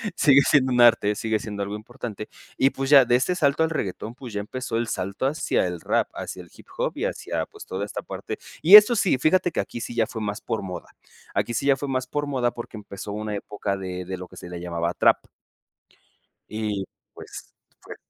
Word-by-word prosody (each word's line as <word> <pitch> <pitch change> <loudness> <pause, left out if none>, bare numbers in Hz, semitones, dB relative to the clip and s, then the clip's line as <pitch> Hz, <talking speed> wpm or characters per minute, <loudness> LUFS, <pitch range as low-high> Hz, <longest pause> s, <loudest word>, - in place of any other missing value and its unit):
sigue 140 -4 +6
siendo 135 -2 +3
un 120 - +4
arte, 115 -3 +5
sigue 110 +1 -1
siendo 105 -1 -5
algo 100 +1 -4
importante. 110 -1 -7 0.3
Y, 135 - +4
pues, 135 0 -3
ya 140 -2 +9
de 120 - +3
este 130 +8 +1
salto 150 -2 +2
al 160 - +1
reguetón, 110 - -4
pues, 125 -2 -9
ya 105 - -2
empezó 130 +3 -4
el 115 0 -1
salto 100 +5 -3
hacia 145 -8 0
el 90 -2 -5
rap, - - +1
hacia - - -6
el - - -18
hip - - -17
hop - - -1
y - - -1
hacia, - - -3
pues, - - -12
toda 95 +2 -4
esta 105 - -6
parte. - - -6 0.2
Y 180 +6 +9
esto 210 +3 +9
sí, 195 - +2
fíjate 175 +6 +2
que - - -3
aquí 120 - -4
sí 120 - -6
ya 115 - +3
fue 110 - -6
más 105 0 -3
por 110 - -3
moda, 90 -2 -7 0.5
aquí 120 - 0
sí 125 - -2
ya 140 - +5
fue 140 +2 -4
más 130 -1 -2
por 145 0 -2
moda, 125 -4 0
porque 120 -1 -9
empezó 100 -1 -8
una 105 0 -4
época 100 -1 -3
de 90 -1 -5
de 95 +1 -5
lo 90 0 -8
que - - -16
se 90 - -9
le 90 - -6
llamaba 85 0 -2
trap. - - +4 1.3
Y, 105 -2 -2 0.3
pues, - - -11 0.5
fue - - -10
115 Hz, 225 wpm, -24 LUFS, 100-135 Hz, 1.3 s, ya